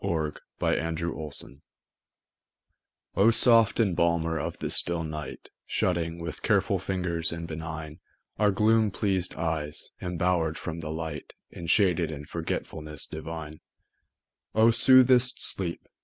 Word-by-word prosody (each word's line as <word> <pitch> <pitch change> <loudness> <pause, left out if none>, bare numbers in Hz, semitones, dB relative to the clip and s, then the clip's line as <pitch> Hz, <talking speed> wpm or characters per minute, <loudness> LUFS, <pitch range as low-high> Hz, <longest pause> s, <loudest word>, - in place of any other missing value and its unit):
John 80 -3 0 0.3
Keats 80 0 0
To 80 -2 -4
Sleep 70 0 -4 1.5
O 100 +4 +5
SOFT 115 -1 +5
embalmer 85 -4 +1
of - - -4
the - - -3
still 85 -1 +1
midnight, 75 -4 -7 0.2
Shutting, 85 -2 0
with 85 -3 -6
careful - - +2
fingers 90 -3 -1
and 85 0 -5
benign, 80 -1 -6 0.4
Our 105 -1 +4
gloom 110 +2 +3
pleas'd 95 -2 -1
eyes, 80 -2 -3
embower'd 90 -2 0
from 85 0 -5
the 80 -2 -6
light, 80 -2 -5 0.2
Enshaded 85 -1 +2
in 75 -2 -7
forgetfulness 75 -2 -4
divine: 80 -1 -7 1.0
O 110 +1 +6
soothest 125 +1 +5
Sleep! 85 -3 +1
85 Hz, 120 wpm, -27 LUFS, 80-95 Hz, 1.5 s, O